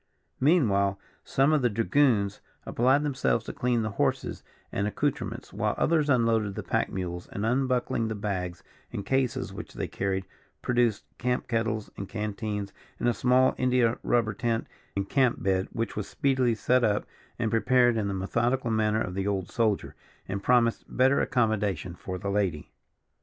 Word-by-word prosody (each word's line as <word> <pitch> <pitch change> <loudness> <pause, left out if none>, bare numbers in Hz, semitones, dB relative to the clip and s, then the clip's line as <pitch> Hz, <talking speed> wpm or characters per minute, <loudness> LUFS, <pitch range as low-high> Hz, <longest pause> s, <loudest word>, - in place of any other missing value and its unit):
Meanwhile, 100 - +3 0.2
some 135 +3 +2
of 150 - +3
the 125 - +3
dragoons 115 -2 +2 0.2
applied 130 +5 +3
themselves 130 -5 0
to - - -5
clean 120 -2 0
the 110 - -2
horses - - 0 0.3
and 100 +1 -1
accoutrements, 145 +6 -3
while - - 0
others 155 -1 +2
unloaded 115 -5 +2
the - - -4
pack - - 0
mules, 90 -2 -4
and 100 - -4
unbuckling 125 -2 +1
the 110 - -3
bags 90 -4 -3 0.3
and 100 - -5
cases 130 +1 0
which - - -8
they - - -3
carried, 95 -1 -2 0.4
produced 120 -3 +1
camp 125 +1 -1
kettles 110 -2 -1
and 95 - -6
canteens, 105 -1 -3 0.3
and - - 0
a - - +2
small 125 +2 +3
India 125 -2 +2
rubber 115 -3 +1
tent 115 +1 -1 0.3
and 100 0 -1
camp 130 -1 +2
bed, 95 -1 +1
which 115 0 -3
was 105 -1 -3
speedily 130 -4 +1
set 125 +3 +2
up 105 -2 +1 0.3
and 115 -2 -1
prepared 120 +1 +4
in 110 -2 0
the 100 - -2
methodical 115 +6 0
manner 110 0 +2
of 90 - -5
the 95 +1 -2
old 95 -3 -2
soldier, 110 -4 0 0.3
and 95 +1 -3
promised 120 +1 +3
better 130 +2 +3
accommodation 105 - 0
for 90 +1 -6
the 100 +1 -3
lady. 95 -7 -1
115 Hz, 165 wpm, -27 LUFS, 100-125 Hz, 0.4 s, prepared